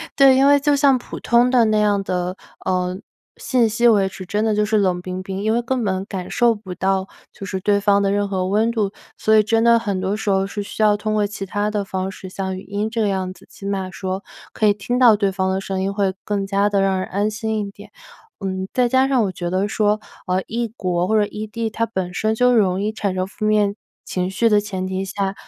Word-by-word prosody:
对， 275 Hz, -1 st, +6 dB
因 270 Hz, -, +4 dB
为 285 Hz, 0 st, +6 dB
就 290 Hz, +1 st, +2 dB
像 280 Hz, -1 st, +4 dB
普 -, -, -8 dB
通 240 Hz, +1 st, +3 dB
的 250 Hz, -2 st, +4 dB
那 215 Hz, -1 st, +2 dB
样 205 Hz, -1 st, +2 dB
的， 180 Hz, 0 st, -2 dB, 0.3 s
呃， 180 Hz, -1 st, 0 dB, 0.4 s
信 245 Hz, -3 st, +2 dB
息 225 Hz, +2 st, +2 dB
维 205 Hz, -4 st, +4 dB
持， 190 Hz, -1 st, -9 dB
真 205 Hz, +3 st, 0 dB
的 220 Hz, -, +2 dB
就 210 Hz, 0 st, +2 dB
是 215 Hz, +1 st, +1 dB
冷 185 Hz, -3 st, +1 dB
冰 185 Hz, +1 st, -5 dB
冰。 190 Hz, +1 st, -5 dB
因 220 Hz, +1 st, +1 dB
为 240 Hz, -, +1 dB
根 250 Hz, 0 st, -1 dB
本 190 Hz, -2 st, -1 dB
感 190 Hz, -2 st, -6 dB
受 240 Hz, -1 st, +3 dB
不 200 Hz, -4 st, -8 dB
到 190 Hz, 0 st, 0 dB, 0.2 s
就 -, -, -12 dB
是 190 Hz, -1 st, -3 dB
对 200 Hz, +1 st, +2 dB
方 200 Hz, 0 st, +3 dB
的 195 Hz, -, +1 dB
任 205 Hz, 0 st, 0 dB
何 185 Hz, -2 st, -1 dB
温 215 Hz, +4 st, +2 dB
度， 215 Hz, -4 st, -1 dB, 0.3 s
所 220 Hz, -, +3 dB
以 215 Hz, -, +7 dB
真 225 Hz, +2 st, +1 dB
的 235 Hz, 0 st, +5 dB
很 200 Hz, -4 st, -2 dB
多 190 Hz, +2 st, -1 dB
时 215 Hz, -1 st, -3 dB
候 195 Hz, 0 st, +2 dB
是 205 Hz, +1 st, -5 dB
需 205 Hz, +2 st, -3 dB
要 210 Hz, -1 st, +5 dB
通 215 Hz, +1 st, -2 dB
过 210 Hz, -1 st, +2 dB
其 200 Hz, -1 st, -6 dB
他 205 Hz, +2 st, -1 dB
的 210 Hz, -1 st, -1 dB
方 190 Hz, -1 st, -3 dB
式， 190 Hz, 0 st, -10 dB
像 190 Hz, 0 st, -4 dB
语 -, -, -9 dB
音 205 Hz, +3 st, -3 dB
这 230 Hz, 0 st, -1 dB
个 210 Hz, -, +2 dB
样 190 Hz, -2 st, -2 dB
子， -, -, -19 dB
起 195 Hz, -, -12 dB
码 195 Hz, -2 st, -2 dB
说 190 Hz, +1 st, -4 dB, 0.3 s
可 215 Hz, -, +2 dB
以 205 Hz, -, +5 dB
听 245 Hz, +5 st, -2 dB
到 240 Hz, -4 st, +7 dB
对 200 Hz, -1 st, +1 dB
方 190 Hz, 0 st, -1 dB
的 190 Hz, 0 st, 0 dB
声 195 Hz, -1 st, -3 dB
音， 195 Hz, +1 st, -1 dB
会 200 Hz, -1 st, 0 dB
更 205 Hz, -1 st, -2 dB
加 200 Hz, +1 st, +1 dB
地 200 Hz, -1 st, +1 dB
让 195 Hz, -1 st, +1 dB
人 185 Hz, -, -3 dB
安 205 Hz, +3 st, -1 dB
心 220 Hz, 0 st, -2 dB
一 -, -, -9 dB
点。 205 Hz, +1 st, -14 dB, 0.5 s
嗯， 190 Hz, -1 st, -3 dB
再 250 Hz, -1 st, +2 dB
加 260 Hz, +2 st, +3 dB
上 260 Hz, -4 st, +2 dB
我 195 Hz, -, -1 dB
觉 175 Hz, -1 st, -4 dB
得 190 Hz, +3 st, 0 dB
说， 210 Hz, 0 st, +1 dB, 0.3 s
呃， 185 Hz, +1 st, 0 dB
异 235 Hz, +1 st, -2 dB
国 180 Hz, -1 st, 0 dB
或 220 Hz, +2 st, +2 dB
者 210 Hz, -, +3 dB
异 210 Hz, +1 st, -6 dB
地， 225 Hz, +1 st, -3 dB
它 230 Hz, +2 st, -1 dB
本 185 Hz, -5 st, -4 dB
身 220 Hz, +4 st, 0 dB
就 250 Hz, +2 st, +4 dB
容 190 Hz, -4 st, +2 dB
易 215 Hz, -, 0 dB
产 200 Hz, -3 st, -2 dB
生 185 Hz, 0 st, 0 dB
负 200 Hz, +2 st, -6 dB
面 210 Hz, -1 st, +2 dB, 0.3 s
情 180 Hz, 0 st, -2 dB
绪 230 Hz, +4 st, +2 dB
的 210 Hz, -1 st, +5 dB
前 195 Hz, -3 st, -4 dB
提 190 Hz, +1 st, -3 dB
下， 195 Hz, 0 st, -2 dB
205 Hz, 280 characters per minute, -21 LUFS, 190-220 Hz, 0.5 s, 以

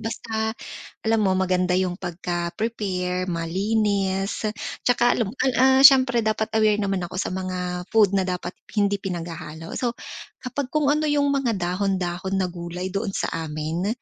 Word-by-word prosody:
Basta, 220 Hz, 0 st, -3 dB, 0.5 s
alam 225 Hz, -1 st, +3 dB
mo 190 Hz, -, +3 dB
maganda 185 Hz, -1 st, +1 dB
yung 180 Hz, -1 st, +1 dB
pagka-prepare 180 Hz, +1 st, -3 dB
malinis 195 Hz, +3 st, 0 dB, 0.4 s
tsaka 245 Hz, 0 st, +3 dB
alam 215 Hz, -4 st, -1 dB
an 260 Hz, 0 st, +3 dB
ah, 265 Hz, +1 st, +5 dB
siyempre 255 Hz, -3 st, +4 dB
dapat 220 Hz, 0 st, 0 dB
aware 215 Hz, -1 st, +4 dB
naman 195 Hz, -1 st, 0 dB
ako 185 Hz, -, -9 dB
sa 185 Hz, -, -2 dB
mga 180 Hz, -1 st, -3 dB
food 205 Hz, -3 st, +6 dB
na 190 Hz, -1 st, +1 dB
dapat 180 Hz, 0 st, -3 dB, 0.2 s
hindi 200 Hz, -1 st, +2 dB
pinaghahalo. 165 Hz, -3 st, -6 dB
So, 245 Hz, -1 st, -1 dB, 0.5 s
kapag 255 Hz, +1 st, -3 dB
kung 290 Hz, 0 st, +2 dB
ano 305 Hz, +1 st, +1 dB
yung 285 Hz, -1 st, +2 dB
mga 265 Hz, -6 st, +1 dB
dahon-dahon 185 Hz, 0 st, -1 dB
na 185 Hz, -2 st, 0 dB
gulay 175 Hz, +1 st, -5 dB
doon 200 Hz, 0 st, -2 dB
sa -, -, -1 dB
amin 160 Hz, +3 st, -3 dB
195 Hz, 150 wpm, -24 LUFS, 180-225 Hz, 0.5 s, food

